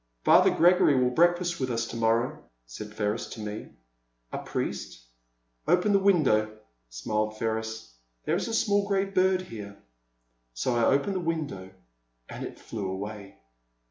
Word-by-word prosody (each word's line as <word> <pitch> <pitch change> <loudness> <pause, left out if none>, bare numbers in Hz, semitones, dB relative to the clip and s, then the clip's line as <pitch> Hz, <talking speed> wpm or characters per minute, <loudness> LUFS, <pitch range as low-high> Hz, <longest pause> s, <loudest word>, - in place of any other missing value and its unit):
Father - - +6
Gregory 175 -3 +4
will 125 -1 +2
breakfast 175 +3 +2
with 130 -1 -1
us 115 -1 -1
to 115 - -8
morrow, 115 +6 +1 0.2
said 105 - -8
Ferris 105 0 -2
to - - -9
me. 105 0 -6 0.7
A - - -2
Priest? - - -5 0.6
Open 180 +4 +3
the 200 - +5
window, 130 - +2 0.3
smiled 110 - -2
Ferris; 110 - -3 0.3
there 155 - +1
is 185 - -2
a 230 - -4
small 205 -2 +2
grey 195 -1 +1
bird 185 -1 +2
here. 105 - -9 0.8
So 120 - 0
I 120 - +3
opened 140 +9 +2
the - - 0
window 155 - -3 0.6
and - - -7
it - - -7
flew 100 -4 -5
away. 100 +1 -6
120 Hz, 150 wpm, -27 LUFS, 110-175 Hz, 0.8 s, Father